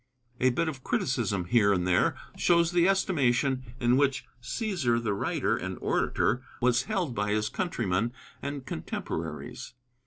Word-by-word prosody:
A 130 - +4
bit 145 +7 0
of 135 -5 -5
criticism 105 -8 0
here 100 +2 +4
and 90 -3 +1
there 90 - +3 0.2
shows 170 -1 +3
the 175 0 +4
estimation 135 -9 +2 0.2
in 120 +1 +3
which 140 -1 +1 0.2
Cæsar 130 - 0
the 105 -2 0
writer 100 - 0
and - - -4
orator 125 - +1 0.2
was 125 +1 +2
held 190 - -1
by 105 -2 -1
his 105 0 0
countrymen 115 - -1 0.3
and 140 -1 -5
contemporaries. 80 - -5
125 Hz, 145 wpm, -28 LUFS, 105-145 Hz, 0.3 s, A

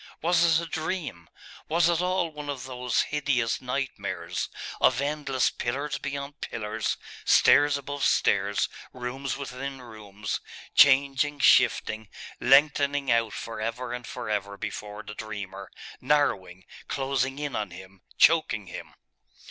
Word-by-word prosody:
Was 170 -1 +4
it - - -4
a - - -9
dream? 155 - -4 0.4
Was 165 +1 +3
it 170 0 +2
all 180 -2 0
one 150 -1 -7
of 135 -3 -4
those 125 -2 0
hideous 140 -6 0
nightmares 130 +1 -3 0.3
of 125 -1 +4
endless 140 -2 0
pillars 140 +3 -3
beyond 140 +1 -5
pillars, 110 -1 -3 0.3
stairs 145 0 +5
above 140 +1 -5
stairs, - - +2 0.3
rooms 130 +2 -4
within 135 0 -6
rooms, 105 -4 -6 0.3
changing, 140 +1 +5
shifting, 110 -5 +3 0.3
lengthening 140 0 +4
out 115 -2 +2
for 115 -1 -6
ever 120 +2 -3
and 125 0 -6
for - - -6
ever 100 -1 -2
before 105 +1 -6
the 105 0 -8
dreamer, 100 -3 -7 0.3
narrowing, 100 -11 +1 0.2
closing 135 -1 -1
in 145 -1 -3
on 105 -2 -2
him, 95 +2 -13 0.2
choking 140 -11 +4
him? 90 - -9
130 Hz, 130 wpm, -27 LUFS, 110-145 Hz, 0.4 s, stairs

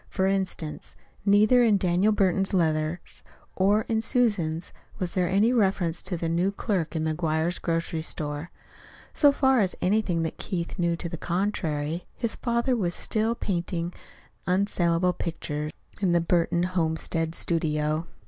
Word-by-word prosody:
For 190 - 0
instance: 190 -5 -2 0.3
neither 215 +5 +5
in 215 -3 +4
Daniel 185 +3 +2
Burton's 195 -1 +2
letters, 160 -1 -1 0.4
nor 200 +3 +4
in 220 -1 0
Susan's, 200 - 0 0.2
was 180 -2 -3
there 180 -2 +1
any 210 +6 +3
reference 190 -7 +1
to 185 -2 -2
the 165 - -2
new 175 +4 +1
clerk 190 -6 -2
in 160 - 0
McGuire's 160 +1 0
grocery 165 -1 -1
store. 150 +1 -3 0.6
So 290 -2 +5
far 265 -2 +3
as 190 -4 +1
anything 185 -4 +1
that 160 - -4
Keith 175 -4 -4
knew 170 -1 +2
to 170 - -5
the 170 0 -5
contrary, 170 -3 -2
his 230 -2 -1
father 235 +1 0
was 180 -6 -1
still 225 +2 0
painting 175 -4 -2 0.5
unsalable 180 -2 +2
pictures 150 -3 -4 0.3
in 185 -3 +2
the 170 - +4
Burton 170 0 +1
home 170 -3 0
stead 165 0 -2
studio. 155 -1 -1
175 Hz, 150 wpm, -26 LUFS, 165-200 Hz, 0.6 s, neither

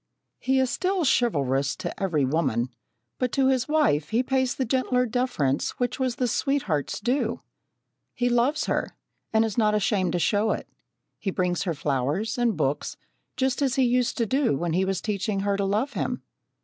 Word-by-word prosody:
He 265 +1 +1
is 260 -1 +1
still 370 -2 0
chivalrous 140 - +1
to - - -6
every 165 -8 +1
woman, 130 -5 0 0.5
but 250 -1 0
to 270 -1 +3
his 260 -3 +1
wife 295 - +2
he 230 +3 +2
pays 260 -1 0
the 260 - -1
gentler 250 0 +1
deference 230 - -1
which 245 +1 -1
was 255 -2 0
the 250 - 0
sweetheart's 230 - -1
due. 240 0 -1 0.7
He 245 - +1
loves 245 +5 +2
her, - - -2 0.4
and 220 0 +3
is 220 +1 -2
not 210 -1 +3
ashamed 195 -4 +1
to - - +1
show 205 +5 +2
it. - - -6 0.5
He 200 - -2
brings 180 -1 -1
her 170 -3 -1
flowers 150 - -1
and 235 -6 +1
books, 145 -1 -1 0.4
just 265 +1 0
as 270 -2 +1
he 265 - +3
used 250 0 +1
to 230 - +1
do 260 - +1
when 170 +1 -2
he 185 +3 +2
was 190 -1 -1
teaching 200 -1 -1
her 200 0 +1
to 200 0 0
love 215 +8 0
him. 245 0 -3
225 Hz, 185 wpm, -26 LUFS, 175-255 Hz, 0.7 s, to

